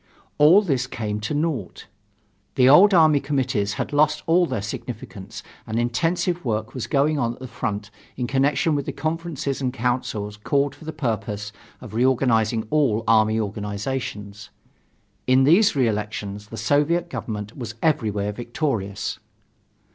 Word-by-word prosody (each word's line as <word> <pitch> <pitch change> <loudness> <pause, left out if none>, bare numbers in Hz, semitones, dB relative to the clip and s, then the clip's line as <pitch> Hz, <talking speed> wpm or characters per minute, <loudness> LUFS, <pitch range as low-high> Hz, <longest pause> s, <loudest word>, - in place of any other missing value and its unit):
All 165 +8 +7
this 135 -9 0
came 105 -4 -4
to 110 +7 -3
naught. 145 - -3 0.7
The 130 -1 +5
old 180 +10 +8
army 155 -5 +5
committees 130 -7 -1
had - - -4
lost 150 +1 +2
all 175 +2 +3
their 120 -8 -3
significance, 105 -2 -7 0.2
and 110 0 -2
intensive 165 - 0
work 110 -3 -2
was 130 - -4
going 150 +1 +2
on 120 -2 0
at - - -15
the 130 - -7
front 105 -2 -4 0.3
in 125 - -1
connection 140 +4 +1
with 145 -2 -2
the - - -3
conferences 155 -4 -3
and 130 -1 0
councils 120 -4 -2
called 140 +6 0
for 160 - -15
the 160 - -4
purpose 110 -7 -3 0.3
of - - -10
reorganizing 115 -2 +2
all 135 -8 +2
army 110 0 +4
organizations. 105 0 -4 0.8
In 130 +1 +5
these 175 +9 +5
re 130 -4 +3
elections 105 -1 -4
the 115 - -9
Soviet 160 +7 +1
Government 105 -8 -6
was 115 -4 -6
everywhere 105 -10 +1
victorious. 115 -3 -3
125 Hz, 145 wpm, -23 LUFS, 105-145 Hz, 0.8 s, old